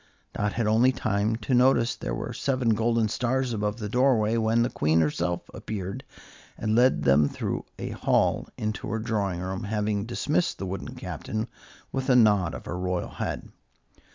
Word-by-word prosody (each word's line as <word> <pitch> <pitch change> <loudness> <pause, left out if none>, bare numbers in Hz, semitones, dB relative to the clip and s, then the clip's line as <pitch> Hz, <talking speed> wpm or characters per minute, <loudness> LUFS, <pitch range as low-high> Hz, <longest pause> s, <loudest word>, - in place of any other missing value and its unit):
Dot 105 -1 -1
had 115 - 0
only 115 +4 +4
time 110 -3 0
to 115 +4 -3
notice 125 -1 +4
that - - -18
there - - -2
were - - -4
seven 130 -3 0
golden 115 0 +2
stars 125 +3 0
above 105 0 -1
the 105 -3 -4
doorway, 115 -2 +3
when 115 +1 +2
the 120 - -1
Queen 80 +2 +2
herself 85 +3 0
appeared 105 +4 -5 0.5
and 110 - -1
led 125 +2 +4
them 70 +2 +4
through - - -3
a - - -4
hall - - +1
into 110 -1 -3
her 110 +1 -1
drawing 105 -6 -1
room, 95 +4 -4
having 105 0 -1
dismissed 150 +7 0
the 95 - -4
wooden 95 0 -5
Captain 110 +1 -4 0.4
with 135 0 -2
a 125 - +6
nod 105 -7 +4
of - - -9
her 90 - -4
royal 90 -1 -2
head. - - -4
110 Hz, 180 wpm, -26 LUFS, 100-120 Hz, 0.5 s, a